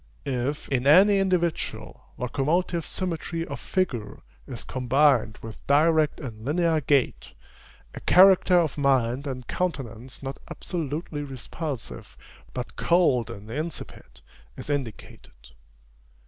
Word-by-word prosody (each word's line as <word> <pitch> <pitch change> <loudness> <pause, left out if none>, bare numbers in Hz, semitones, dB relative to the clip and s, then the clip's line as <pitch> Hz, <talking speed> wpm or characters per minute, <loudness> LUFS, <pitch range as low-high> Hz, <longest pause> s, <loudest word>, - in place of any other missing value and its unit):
If, 135 +1 -2
in 130 -1 0
any 195 +6 +7
individual, 180 -4 -1
locomotive 160 +7 -1
symmetry 165 -2 -3
of 140 -5 -6
figure 125 - -2 0.2
is 120 -5 -6
combined 130 -3 +2
with 110 -1 -9
direct 155 +1 +3
and 110 -7 -8
linear 160 +3 +1
gait, 140 -2 0 0.6
a - - -7
character 185 -1 +6
of 160 -4 +1
mind 135 -1 +1
and 130 -2 -5
countenance 130 -8 -4
not 135 0 -5
absolutely 155 -2 -4
repulsive, 135 0 -6 0.3
but 125 -1 -6
cold 165 -10 +3
and 105 +2 -9
insipid, 145 - -6 0.4
is - - -5
indicated. 110 - -6
140 Hz, 110 wpm, -26 LUFS, 125-165 Hz, 0.6 s, any